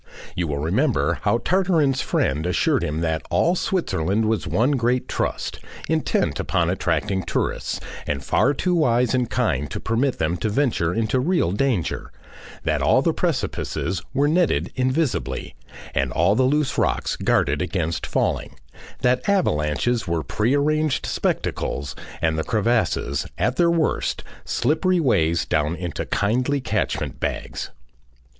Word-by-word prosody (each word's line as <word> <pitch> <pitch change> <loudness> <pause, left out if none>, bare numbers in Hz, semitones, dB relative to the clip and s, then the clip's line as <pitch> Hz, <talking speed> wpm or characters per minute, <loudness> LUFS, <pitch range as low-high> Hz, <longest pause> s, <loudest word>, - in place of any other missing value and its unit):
You 90 -2 -1
will 75 -2 -2
remember 85 - +1
how 105 +2 +2
Tartarin's 160 -5 +2
friend 75 +5 0
assured 90 - +2
him 75 +2 -2
that 80 -1 0
all 90 - +3
Switzerland 110 - 0
was 110 0 0
one 120 +6 +2
great 125 -2 +1
Trust, - - -2 0.3
intent - - 0
upon - - +1
attracting 100 -2 0
tourists 85 - -2 0.3
and 70 -2 -2
far 145 - +2
too 180 +5 0
wise 125 -7 +2
and 125 -2 +1
kind 75 - 0
to - - -4
permit 120 +4 0
them 80 +3 0
to 110 - -1
venture 110 - +1
into 115 +5 0
real 165 - +1
danger, 105 -4 -1 0.5
that - - 0
all - - +4
the - - +2
precipices 90 -2 -2
were 140 +2 +2
netted 155 - +1
invisibly, 130 - -1 0.4
and 65 -2 0
all 85 +5 +3
the 120 - +2
loose 145 +1 +1
rocks - - 0
guarded 70 +1 +1
against 85 -3 -2
falling, - - -1 0.5
that 125 +5 +1
avalanches 115 - +1
were 85 -2 -1
prearranged 145 - +1
spectacles 70 0 -2 0.3
and 80 -1 +1
the - - 0
crevasses 110 - 0
at 125 - 0
their 170 -1 +4
worst 165 -2 0 0.2
slippery 180 +4 +1
ways 85 - +2
down 75 +2 0
into 85 -3 -4
kindly 125 +7 +1
catchment 130 - -2
bags. - - -3
115 Hz, 140 wpm, -23 LUFS, -, 0.5 s, all